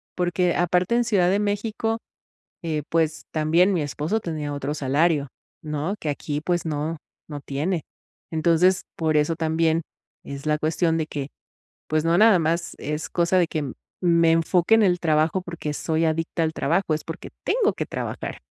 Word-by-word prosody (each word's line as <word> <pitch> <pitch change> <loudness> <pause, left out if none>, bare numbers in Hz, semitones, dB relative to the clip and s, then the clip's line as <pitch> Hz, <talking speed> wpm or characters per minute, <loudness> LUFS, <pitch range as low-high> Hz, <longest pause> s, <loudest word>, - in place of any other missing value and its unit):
porque 175 0 +1
aparte 180 +5 +2
en 240 - +3
Ciudad 190 -6 +3
de 200 - +2
México, 215 +2 -1 0.6
eh, 155 -3 -2
pues, 160 -1 0
también 165 +5 +3
mi 175 - +1
esposo 150 +8 -2
tenía 155 -5 -4
otro 145 0 -3
salario, 145 +1 +1 0.4
¿no?, 155 +5 -2
que 155 - -3
aquí 145 +1 -3
pues 175 +2 0
no, 155 +1 -2 0.3
no 145 -2 -6
tiene. 155 +6 -2 0.5
Entonces, 170 +3 +3
por 160 -2 +1
eso 150 +2 +2
también 160 0 +1 0.4
es 140 +1 -8
la 150 0 +2
cuestión 165 +1 +1
de 160 - 0
que, 140 -3 -4 0.6
pues 155 0 +1
no, 165 +1 +3
nada 215 -2 +6
más, 170 +2 -1
es 150 +1 -3
cosa 175 +1 +2
de 180 - +4
que 150 -6 -3 0.3
me 170 -2 +4
enfoque 170 +4 +3
en 225 - +4
el 180 -3 +3
trabajo 160 +2 +2
porque 170 -4 -5
soy 160 +2 0
adicta 165 +1 -1
al 160 - 0
trabajo, 165 +4 +1
es 155 - -6
porque 165 - -7 0.2
tengo 450 -4 +2
que - - -3
trabajar. - - -5
165 Hz, 170 wpm, -24 LUFS, 155-180 Hz, 0.6 s, nada